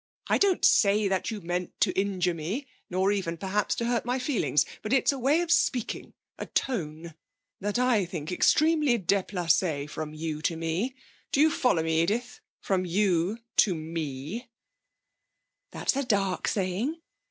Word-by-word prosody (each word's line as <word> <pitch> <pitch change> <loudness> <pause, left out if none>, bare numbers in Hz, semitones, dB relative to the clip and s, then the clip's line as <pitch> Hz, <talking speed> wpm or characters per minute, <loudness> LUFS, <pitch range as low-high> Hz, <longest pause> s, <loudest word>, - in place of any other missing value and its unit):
I - - +3
don't 395 -3 +3
say 205 0 +4
that 190 -1 -1
you 215 -3 -5
meant 175 +1 -4
to - - +4
injure 190 -3 0
me, 180 - -4 0.2
nor 190 +2 +1
even, 180 -5 -2
perhaps, 195 +4 -1
to 235 - -2
hurt 235 -1 0
my 245 +2 -1
feelings. 255 - +1 0.2
But 215 - -2
it's 270 - +4
a 275 - -5
way 285 +7 +3
of 345 -1 -2
speaking 260 -8 0 0.2
a - - -5
tone 165 - -3 0.5
that 205 +3 -1
I 245 -6 +3
think 165 -2 -6
extremely 300 - +3
déplacé, 175 -6 0
from 155 0 -6
you 155 -1 -4
to 165 +1 0
me. 170 +11 -2 0.4
Do - - +1
you 310 +1 +5
follow 250 - +2
me, 160 0 +2
Edith? 235 +8 -1 0.2
From 190 -2 0
you 185 +1 +1 0.2
to 190 -4 +5
me.' 160 - -5 1.2
'That's - - -1
a 275 - 0
dark 200 -6 0
saying. 205 - -1
195 Hz, 160 wpm, -27 LUFS, 165-245 Hz, 1.2 s, you